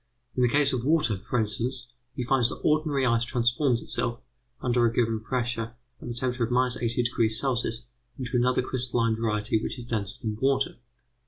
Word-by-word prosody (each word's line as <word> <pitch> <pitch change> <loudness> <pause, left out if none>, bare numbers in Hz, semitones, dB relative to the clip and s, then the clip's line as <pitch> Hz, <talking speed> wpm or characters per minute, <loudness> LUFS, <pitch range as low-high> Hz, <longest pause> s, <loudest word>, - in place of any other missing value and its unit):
In 125 - +1
the 125 - +4
case 140 +1 +3
of 120 -2 -1
water, 150 -7 +2
for 125 - +1
instance, 120 +3 0 0.3
he 125 - -2
finds 120 -1 +3
that - - -6
ordinary 150 -3 +2
ice 115 -1 +3
transforms 120 +1 +1
itself, 120 0 -2 0.4
under 120 -1 +2
a 115 - +4
given 115 -2 +1
pressure, 115 -1 -2 0.3
at - - -8
the 120 - -4
temperature 125 -1 0
of - - -7
80° 120 0 +1
C. 115 - -1 0.5
into 125 -2 -4
another 125 +1 +3
crystalline 120 -3 0
variety 110 -1 0
which - - -4
is 120 - -7
denser 110 -1 -3
than 110 -2 -2
water. 135 0 +1
120 Hz, 175 wpm, -27 LUFS, 115-130 Hz, 0.5 s, the